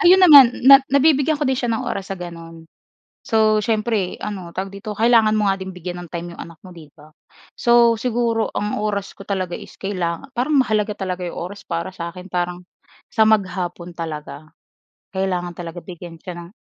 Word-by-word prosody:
Ayun 375 Hz, -1 st, +6 dB
naman 270 Hz, -7 st, +8 dB
na 275 Hz, +1 st, +10 dB
nabibigyan 285 Hz, +2 st, +3 dB
ko 295 Hz, -, -2 dB
din 260 Hz, -2 st, 0 dB
siya 245 Hz, -, -1 dB
ng 225 Hz, -, -1 dB
oras 195 Hz, -1 st, -4 dB
sa 195 Hz, -, -4 dB
gano'n. 165 Hz, -2 st, -9 dB, 0.6 s
So, 215 Hz, -1 st, +2 dB
siyempre 215 Hz, -3 st, -1 dB
ano, 190 Hz, -5 st, -6 dB
tawag 190 Hz, +3 st, -5 dB
dito 205 Hz, +1 st, -7 dB
kailangan 225 Hz, -2 st, +4 dB
mo 210 Hz, -, +1 dB
nga 195 Hz, -, +3 dB
din 190 Hz, -, -5 dB
bigyan 180 Hz, -1 st, -7 dB
ng 175 Hz, -, -11 dB
time 170 Hz, +1 st, -6 dB
'yong -, -, -9 dB
anak 170 Hz, -1 st, -11 dB
mo, 185 Hz, -, -11 dB
'di 160 Hz, -3 st, -13 dB
ba? 155 Hz, +1 st, -17 dB, 0.4 s
So, 235 Hz, -1 st, +4 dB
siguro 230 Hz, -1 st, 0 dB
ang 210 Hz, 0 st, -2 dB
oras 200 Hz, -2 st, -2 dB
ko -, -, -14 dB
talaga 185 Hz, -3 st, -2 dB
is -, -, -9 dB
kailanga 185 Hz, +2 st, -4 dB
parang 275 Hz, +5 st, +1 dB
mahalaga 215 Hz, -5 st, +1 dB
talaga 185 Hz, -2 st, -4 dB
'yong -, -, -7 dB
oras 190 Hz, +4 st, -6 dB
para 170 Hz, +2 st, -3 dB
sa 170 Hz, -2 st, -5 dB
'kin, 180 Hz, +1 st, -11 dB
parang 180 Hz, 0 st, -2 dB, 0.5 s
sa -, -, +2 dB
maghapon 180 Hz, -4 st, -1 dB
talaga. 155 Hz, -2 st, -7 dB, 0.6 s
Kailangan 180 Hz, -2 st, -2 dB
talaga 170 Hz, 0 st, -8 dB
bigyan 175 Hz, -2 st, -10 dB
siya 180 Hz, +2 st, -8 dB
ng 170 Hz, +3 st, -13 dB
195 Hz, 190 wpm, -21 LUFS, 175-225 Hz, 0.6 s, na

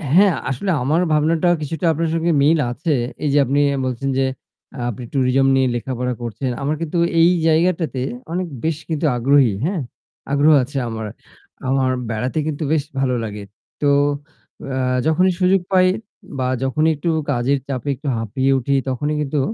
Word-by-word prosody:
হ্যাঁ, 190 Hz, -3 st, +6 dB
আসলে 160 Hz, +9 st, -1 dB
আমার 155 Hz, +6 st, +2 dB
ভাবনাটা 155 Hz, +3 st, +2 dB
কিছুটা 160 Hz, +4 st, -3 dB
আপনার 165 Hz, +1 st, -1 dB
সঙ্গে 165 Hz, +1 st, +1 dB
মিল 155 Hz, +3 st, +4 dB
আছে। 160 Hz, +6 st, -2 dB, 0.3 s
এই 150 Hz, -, +1 dB
যে 145 Hz, -, +4 dB
আপনি 140 Hz, +3 st, +1 dB, 0.3 s
বলছেন 130 Hz, +2 st, -2 dB
যে -, -, +3 dB, 0.5 s
আ -, -, -7 dB
আপনি 120 Hz, +2 st, -6 dB
টুরিজম 135 Hz, 0 st, +2 dB
নিয়ে 130 Hz, -1 st, +3 dB
লেখাপড়া 125 Hz, +1 st, -2 dB
করছেন। 120 Hz, +3 st, -3 dB
আমার 145 Hz, +3 st, 0 dB
কিন্তু 165 Hz, +1 st, -2 dB, 0.2 s
এই 170 Hz, -, +6 dB, 0.2 s
জায়গাটাতে 165 Hz, -4 st, +1 dB, 0.3 s
অনেক 180 Hz, +1 st, -2 dB, 0.2 s
বেশ 160 Hz, -1 st, 0 dB
কিন্তু 160 Hz, 0 st, -1 dB
আগ্রহী 135 Hz, -1 st, +4 dB
হ্যাঁ? 180 Hz, -2 st, -1 dB, 0.5 s
আগ্রহ 145 Hz, +2 st, +5 dB
আছে 140 Hz, +2 st, -6 dB
আমার। 110 Hz, -1 st, -4 dB, 0.6 s
আমার 130 Hz, -1 st, +2 dB, 0.2 s
বেড়াতে 125 Hz, +6 st, -2 dB
কিন্তু 155 Hz, 0 st, -3 dB
বেশ 155 Hz, -3 st, +1 dB, 0.2 s
ভালো 130 Hz, -2 st, +1 dB
লাগে। 105 Hz, -2 st, -6 dB, 0.4 s
তো 145 Hz, -, +2 dB, 0.8 s
এ্যা 130 Hz, -, -1 dB, 0.3 s
যখনই 180 Hz, +4 st, +3 dB
সুযোগ 185 Hz, 0 st, +3 dB
পাই 185 Hz, -1 st, +5 dB, 0.5 s
বা 130 Hz, -, 0 dB, 0.2 s
যখনই 155 Hz, +4 st, +2 dB
একটু 145 Hz, +4 st, -2 dB, 0.2 s
কাজের 130 Hz, +2 st, +1 dB
চাপে 135 Hz, 0 st, -3 dB
একটু 145 Hz, +3 st, -9 dB
হাঁপিয়ে 130 Hz, +5 st, 0 dB
উঠি 140 Hz, +3 st, 0 dB
তখনই 145 Hz, +4 st, -1 dB
কিন্তু 150 Hz, 0 st, -1 dB
145 Hz, 165 wpm, -20 LUFS, 130-160 Hz, 0.8 s, হ্যাঁ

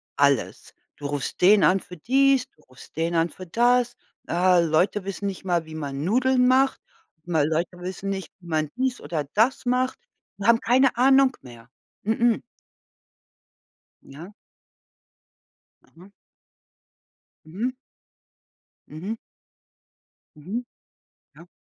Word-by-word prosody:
alles. 140 Hz, -4 st, 0 dB, 0.2 s
Du 145 Hz, -, -9 dB
rufst 145 Hz, -1 st, -4 dB
den 200 Hz, +3 st, +6 dB
an 190 Hz, -, +4 dB
für 180 Hz, -2 st, -12 dB
dies, 270 Hz, -, +2 dB
du -, -, -29 dB
rufst 130 Hz, +2 st, -17 dB
den 165 Hz, +1 st, -1 dB
an 165 Hz, +1 st, +2 dB
für 185 Hz, -, -11 dB
das. 240 Hz, +5 st, +2 dB, 0.3 s
Äh, 180 Hz, +1 st, +4 dB
Leute 175 Hz, +5 st, +1 dB
wissen 195 Hz, +1 st, -5 dB
nicht 195 Hz, -, -6 dB
mal, 175 Hz, -3 st, 0 dB
wie 160 Hz, 0 st, -10 dB
man 140 Hz, -2 st, -4 dB
Nudeln 255 Hz, +4 st, +3 dB
macht, 265 Hz, +1 st, +3 dB, 0.5 s
Leute 165 Hz, +2 st, -1 dB
wissen 190 Hz, +2 st, -5 dB
nicht, 190 Hz, -1 st, -4 dB
wie 175 Hz, -, -16 dB
man 155 Hz, -2 st, -1 dB
dies 260 Hz, -1 st, -1 dB
oder 155 Hz, -4 st, -3 dB
das 245 Hz, +6 st, +2 dB
macht, 255 Hz, -, 0 dB, 0.4 s
die 200 Hz, -, -6 dB
haben 235 Hz, 0 st, +6 dB
keine 255 Hz, +1 st, +3 dB
Ahnung 265 Hz, +1 st, +4 dB
mehr. 120 Hz, -1 st, -14 dB, 0.3 s
Mh-mh. 225 Hz, +2 st, +2 dB, 1.6 s
Ja. 165 Hz, +9 st, -12 dB, 1.5 s
Aha. 180 Hz, +4 st, -18 dB, 1.4 s
Mhm. 225 Hz, +11 st, -3 dB, 1.1 s
Mhm. 185 Hz, +9 st, -5 dB, 1.2 s
Mhm. 195 Hz, +12 st, -5 dB, 0.7 s
Ja. -, -, -15 dB
190 Hz, 120 wpm, -24 LUFS, 160-245 Hz, 1.6 s, den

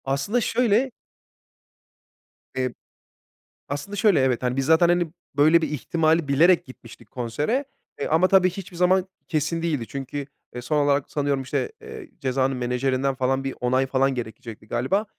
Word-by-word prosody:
Aslında 140 Hz, -, 0 dB
şöyle 240 Hz, +2 st, +2 dB, 1.6 s
ep 130 Hz, -1 st, -2 dB, 0.9 s
aslında 145 Hz, +9 st, -4 dB
şöyle, 205 Hz, -5 st, +4 dB
evet, 130 Hz, -2 st, +1 dB
hani, 125 Hz, 0 st, 0 dB
biz 135 Hz, -, 0 dB
zaten, 160 Hz, +3 st, +5 dB
hani, 175 Hz, -2 st, +1 dB, 0.2 s
böyle 155 Hz, +4 st, +5 dB
bir -, -, -1 dB
ihtimali 160 Hz, +2 st, +1 dB
bilerek 165 Hz, +6 st, +4 dB
gitmiştik 125 Hz, -3 st, -14 dB
konsere. 145 Hz, -, -1 dB, 0.3 s
E, -, -, -2 dB
ama 160 Hz, +4 st, +3 dB
tabii 185 Hz, -1 st, +5 dB
hiçbir 180 Hz, -1 st, -9 dB
zaman 185 Hz, +1 st, +3 dB, 0.2 s
kesin 160 Hz, 0 st, -1 dB
değildi. 150 Hz, -9 st, -2 dB
Çünkü 140 Hz, +1 st, -5 dB, 0.3 s
e 125 Hz, -, -6 dB
son 150 Hz, +5 st, -1 dB
olarak, 140 Hz, -1 st, +1 dB
sanıyorum, 140 Hz, -2 st, 0 dB
işte, 130 Hz, -, -2 dB
eee, 435 Hz, -7 st, -10 dB
Ceza'nın 130 Hz, 0 st, 0 dB
menajerinden, 130 Hz, +2 st, 0 dB
falan, 130 Hz, +1 st, 0 dB
bir 135 Hz, -1 st, -4 dB
onay, 130 Hz, +2 st, +1 dB
falan, 135 Hz, 0 st, +1 dB
gerekecekti 115 Hz, -2 st, -7 dB
galiba. 130 Hz, -, 0 dB
145 Hz, 150 wpm, -24 LUFS, 130-175 Hz, 1.6 s, zaten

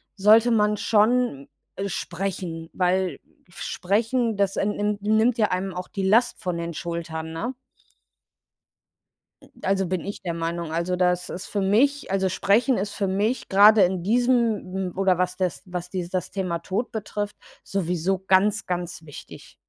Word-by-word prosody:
sollte 215 Hz, +4 st, +5 dB
man 210 Hz, -1 st, +3 dB
schon, 215 Hz, -, +2 dB, 0.3 s
äh, 200 Hz, +1 st, -3 dB
sprechen, 175 Hz, -2 st, -4 dB
weil 180 Hz, -3 st, 0 dB, 0.3 s
f 175 Hz, -, -12 dB
sprechen, 225 Hz, +4 st, 0 dB
das, 200 Hz, -1 st, +1 dB
ähm, 205 Hz, +1 st, +1 dB
nimm 210 Hz, 0 st, -1 dB
nimmt 220 Hz, +3 st, +2 dB
ja 215 Hz, -, +3 dB
einem 185 Hz, +1 st, -2 dB
auch 180 Hz, 0 st, -6 dB
die 195 Hz, -2 st, -4 dB
Last 235 Hz, +4 st, +3 dB
von 180 Hz, -2 st, -2 dB
den 170 Hz, 0 st, -4 dB
Schultern, 160 Hz, -1 st, -5 dB
ne? 240 Hz, +11 st, -3 dB, 2.1 s
Also, 195 Hz, 0 st, +1 dB
bin 180 Hz, -2 st, -2 dB
ich 200 Hz, -, -6 dB
der 170 Hz, -2 st, -3 dB
Meinung. 165 Hz, 0 st, -3 dB
Also 170 Hz, +2 st, 0 dB
das 180 Hz, 0 st, +1 dB
ist 180 Hz, -, -6 dB
für 205 Hz, -, -2 dB
mich, 250 Hz, +6 st, +2 dB
also 190 Hz, -1 st, +1 dB
sprechen 225 Hz, +7 st, +2 dB
ist 200 Hz, +1 st, -3 dB
für 195 Hz, -, -1 dB
mich 210 Hz, +6 st, -1 dB
grade 205 Hz, +1 st, +7 dB
in 180 Hz, -1 st, 0 dB
diesem 230 Hz, -3 st, +1 dB, 0.2 s
m -, -, -18 dB
oder 190 Hz, -2 st, +3 dB
was 180 Hz, 0 st, -1 dB
das 185 Hz, -3 st, -2 dB
was 180 Hz, -1 st, -5 dB
die 180 Hz, -2 st, -3 dB
das 185 Hz, -1 st, -3 dB
Thema 185 Hz, -3 st, -2 dB
Tod 190 Hz, +8 st, -3 dB
betrifft, 205 Hz, -1 st, -4 dB, 0.3 s
sowieso 180 Hz, 0 st, -1 dB
ganz, 190 Hz, +3 st, +2 dB
ganz 175 Hz, -2 st, -4 dB
wichtig. 145 Hz, -, -12 dB
190 Hz, 160 wpm, -24 LUFS, 180-210 Hz, 2.1 s, grade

